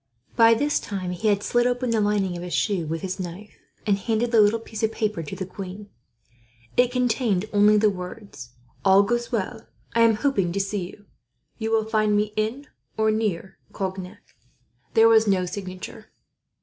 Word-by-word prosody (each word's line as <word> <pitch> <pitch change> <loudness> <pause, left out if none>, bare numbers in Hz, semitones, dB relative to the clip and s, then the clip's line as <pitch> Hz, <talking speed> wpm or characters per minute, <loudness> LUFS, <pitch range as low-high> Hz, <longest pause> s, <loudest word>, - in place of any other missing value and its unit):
By 230 0 +6
this 290 +5 +1
time 185 -3 -4
he 180 +5 -2
had 205 -1 +2
slit 240 0 +2
open 245 0 -1
the 225 -2 +2
lining 205 -3 0
of 175 - -6
his 180 0 -4
shoe 190 -7 0
with 165 +1 -4
his 190 0 -4
knife, 185 +3 -7 0.3
and 200 -2 +2
handed 230 +3 -1
the 225 -3 +6
little 210 +2 +4
piece 220 -1 -8
of 220 -1 +1
paper 210 -5 -2
to 150 - -7
the 190 - -4
queen. 195 +2 -9 0.8
It 245 0 +3
contained 240 -6 +1
only 210 +1 +5
the 210 0 +4
words: 180 - -9 0.3
"All 195 +1 +6
goes 240 +4 -1
well. 225 0 -3 0.3
Am 230 -1 +4
hoping 210 -7 0
to 200 - -1
see 195 -2 -2
you. 205 +2 -15 0.5
You 220 0 -2
will 225 -1 +2
find 215 -1 +2
me 210 0 0
in 225 +7 -2 0.3
or 220 0 +3
near 210 -4 -2
Cognac." 190 -1 -5 0.7
There 225 0 +7
was 220 -1 +5
no 190 -2 +2
signature. 185 0 -7
210 Hz, 180 wpm, -24 LUFS, 190-225 Hz, 0.8 s, There